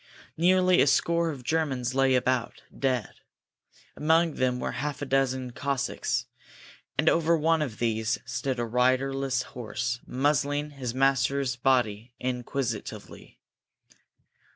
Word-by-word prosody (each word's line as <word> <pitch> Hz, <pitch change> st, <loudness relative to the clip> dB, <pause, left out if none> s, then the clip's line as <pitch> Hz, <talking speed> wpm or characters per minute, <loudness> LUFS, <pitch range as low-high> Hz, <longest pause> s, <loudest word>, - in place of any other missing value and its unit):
Nearly 185 Hz, +2 st, +4 dB
a -, -, +4 dB
score 170 Hz, +4 st, +2 dB
of 140 Hz, -5 st, -6 dB
Germans 130 Hz, -4 st, -1 dB
lay 135 Hz, 0 st, +3 dB
about, 125 Hz, -1 st, 0 dB
dead. 130 Hz, -6 st, -1 dB, 0.8 s
Among 160 Hz, +1 st, +3 dB
them 125 Hz, -2 st, 0 dB
were -, -, -2 dB
half 145 Hz, +2 st, -4 dB
a -, -, -2 dB
dozen 130 Hz, -2 st, 0 dB
Cossacks, 140 Hz, +1 st, -2 dB, 0.7 s
and -, -, +1 dB
over 165 Hz, 0 st, +4 dB
one 160 Hz, +1 st, +2 dB
of 130 Hz, -8 st, -3 dB
these 110 Hz, -2 st, 0 dB
stood 130 Hz, -2 st, -2 dB
a 120 Hz, -, -1 dB
riderless 130 Hz, +2 st, +1 dB
horse, 120 Hz, +1 st, -3 dB
muzzling 145 Hz, +2 st, 0 dB
his 130 Hz, -4 st, -5 dB
master's 135 Hz, 0 st, +2 dB
body 120 Hz, -3 st, +1 dB
inquisitively. 125 Hz, -2 st, -4 dB
130 Hz, 120 wpm, -27 LUFS, 125-145 Hz, 0.8 s, Nearly